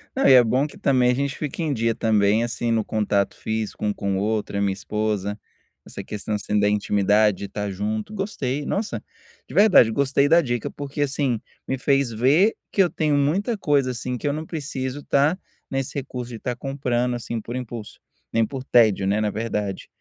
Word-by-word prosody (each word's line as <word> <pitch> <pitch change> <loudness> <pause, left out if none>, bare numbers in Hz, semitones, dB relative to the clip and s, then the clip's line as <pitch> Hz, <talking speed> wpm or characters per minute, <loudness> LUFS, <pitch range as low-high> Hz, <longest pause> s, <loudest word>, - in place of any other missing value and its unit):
Não, 265 - +3
e 135 - +8
é 125 - +8
bom 130 +5 +1
que, - - -14
também, 125 -2 +3
a - - +2
gente 140 +1 -2
fica 150 +2 -4
em 155 -3 0
dia, 115 -1 +1
também, 110 0 +2
assim, 120 0 -2
no 110 -1 +2
contato 100 -2 0
físico 110 -1 -3
um 105 - +1
com 100 -1 -2
o 95 - -1
outro, 105 -1 -1
a 100 - 0
minha 100 -1 +1
esposa, 105 0 -2 0.5
essa - - -8
questão, 105 +1 -5
assim, 105 0 -1
da 105 - +3
intimidade, 105 0 +2
de - - -4
estar 105 +1 -4
junto, 105 - -3
gostei, 150 - -3
nossa, 210 +2 -2 0.4
de - - -11
verdade, 195 - +6
gostei 140 +2 +2
da 165 +3 +6
dica, 120 -5 -2
porque, 145 +1 -5
assim, 135 -4 0 0.3
me 135 - -1
fez 135 -1 +1
ver 140 - +3 0.2
que 200 - +3
eu 180 - +4
tenho 155 -3 0
muita 180 +11 +1
coisa, 145 -8 +1
assim, 125 +1 -4
que 135 - -3
eu 145 - +1
não 155 +1 -4
preciso 140 -3 -4
estar 145 +6 +2 0.3
nesse 135 -1 -3
recurso 125 -3 -5
de 115 - -7
estar 125 +2 -3
comprando, 125 -2 -1
assim, 120 -1 -4
por 120 +3 -7
impulso, 120 -4 -7 0.3
nem 115 0 +3
por 130 +3 -6
tédio, 110 -7 +4
né, 100 +2 +1
na 105 - +1
verdade, 105 -3 -3
120 Hz, 205 wpm, -23 LUFS, 105-140 Hz, 0.5 s, e